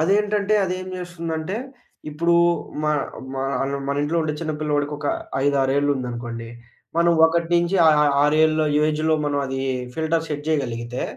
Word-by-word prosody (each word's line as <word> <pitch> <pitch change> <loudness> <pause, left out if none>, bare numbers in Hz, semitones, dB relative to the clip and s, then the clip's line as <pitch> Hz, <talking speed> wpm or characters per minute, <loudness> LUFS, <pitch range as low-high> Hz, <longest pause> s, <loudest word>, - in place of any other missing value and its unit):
అదేంటంటే 205 +4 +2
అదేం 185 0 -3
జేస్తుందంటే, 170 0 -4 0.5
ఇప్పుడూ 170 +3 +1 0.5
మా 150 0 +2 0.4
మా 135 - -2 0.2
అనం 140 0 -2
మనింట్లో 145 +4 0
ఉండే 155 - -1
చిన్నపిల్లోడికొక 150 -2 -2 0.4
ఐదారేళ్ళుందనుకోండి, 130 -4 0 0.5
మనం 170 0 +4 0.2
1 165 0 0
నించి 175 +3 +2
ఆ - - +8
ఆ 150 - +4 0.2
6ఏళ్ళ 155 +1 +3 0.2
ఏజ్‌లో 155 +1 +1
మనం 145 -1 0
అదీ 135 0 -3 0.3
ఫిల్టర్ 160 0 -1
సెట్ 145 -1 -4
చేయగలిగితే, 125 -5 -2
155 Hz, 125 wpm, -22 LUFS, 140-170 Hz, 0.5 s, ఆ